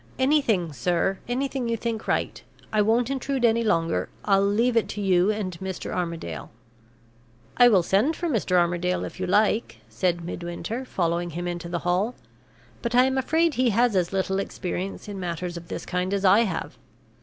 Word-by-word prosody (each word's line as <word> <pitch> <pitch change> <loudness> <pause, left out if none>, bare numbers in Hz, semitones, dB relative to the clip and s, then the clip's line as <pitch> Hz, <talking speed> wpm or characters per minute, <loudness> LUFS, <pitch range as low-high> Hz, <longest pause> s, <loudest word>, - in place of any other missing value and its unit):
"Anything, 260 - +2
sir 180 +7 0
anything 255 0 -2
you 230 - 0
think 225 0 -4
right. - - -1 0.3
I 215 - +4
won't 230 +4 +2
intrude 270 -1 -1
any 230 0 +3
longer; 165 - 0 0.2
I'll 195 -1 +4
leave 230 +5 +2
it 230 - +2
to - - -5
you 190 -1 +3
and 205 -4 -2
Mr. 190 -1 -5
Armadale." 165 - -4 1.1
"I 245 - +8
will 195 -7 +5
send 215 - +2
for 345 - -3
Mr. 220 - 0
Armadale, 175 +1 +1
if - - -9
you 185 - -2
like," 210 - +2
said 170 +9 -1
Midwinter, 175 +9 -5
following 175 -5 -1
him 175 +2 -4
into 175 -1 -4
the 175 0 -4
hall. 190 +7 +1 0.7
"But 235 +1 -2
I 250 - +7
am 265 0 0
afraid 320 +4 +2
he 255 -1 +2
has 230 0 +2
as 180 -2 +1
little 190 0 0
experience 190 0 -4
in 200 -2 -6
matters 175 0 -4
of 170 0 -8
this - - -6
kind 180 +2 -1
as 200 0 -1
I 205 +5 +6
have. 165 - -4
195 Hz, 180 wpm, -25 LUFS, 175-235 Hz, 1.1 s, I